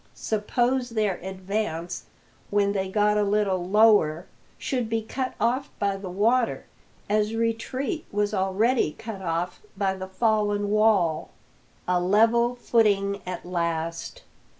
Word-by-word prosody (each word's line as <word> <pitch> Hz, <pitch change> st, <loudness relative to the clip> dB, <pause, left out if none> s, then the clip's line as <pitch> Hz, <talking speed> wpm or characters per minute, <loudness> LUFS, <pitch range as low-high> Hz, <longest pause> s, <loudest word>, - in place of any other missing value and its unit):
Suppose 245 Hz, +4 st, 0 dB
their 215 Hz, -5 st, 0 dB
advance, 190 Hz, -2 st, -4 dB, 0.4 s
when 200 Hz, -1 st, +2 dB
they 190 Hz, -1 st, -2 dB
got 210 Hz, +1 st, +2 dB
a -, -, +3 dB
little 200 Hz, -3 st, +1 dB
lower, 190 Hz, -4 st, +4 dB, 0.3 s
should 250 Hz, -4 st, -2 dB
be 225 Hz, -1 st, -1 dB
cut 255 Hz, +3 st, -4 dB
off 255 Hz, +5 st, 0 dB
by 200 Hz, -1 st, 0 dB
the 195 Hz, -1 st, -7 dB
water, 225 Hz, +6 st, +1 dB, 0.4 s
as 210 Hz, +1 st, +1 dB
retreat 255 Hz, -, -2 dB
was 205 Hz, +1 st, 0 dB
already 195 Hz, 0 st, +1 dB
cut 220 Hz, -4 st, -8 dB
off 175 Hz, 0 st, -2 dB, 0.2 s
by 195 Hz, -1 st, +1 dB
the 190 Hz, 0 st, -6 dB
fallen 205 Hz, 0 st, +1 dB
wall! 210 Hz, -7 st, +2 dB, 0.6 s
A 180 Hz, 0 st, +2 dB
level 230 Hz, +6 st, +3 dB
footing 205 Hz, -4 st, +1 dB
at 180 Hz, -1 st, -5 dB
last! 170 Hz, -2 st, -3 dB
205 Hz, 125 wpm, -25 LUFS, 190-225 Hz, 0.6 s, lower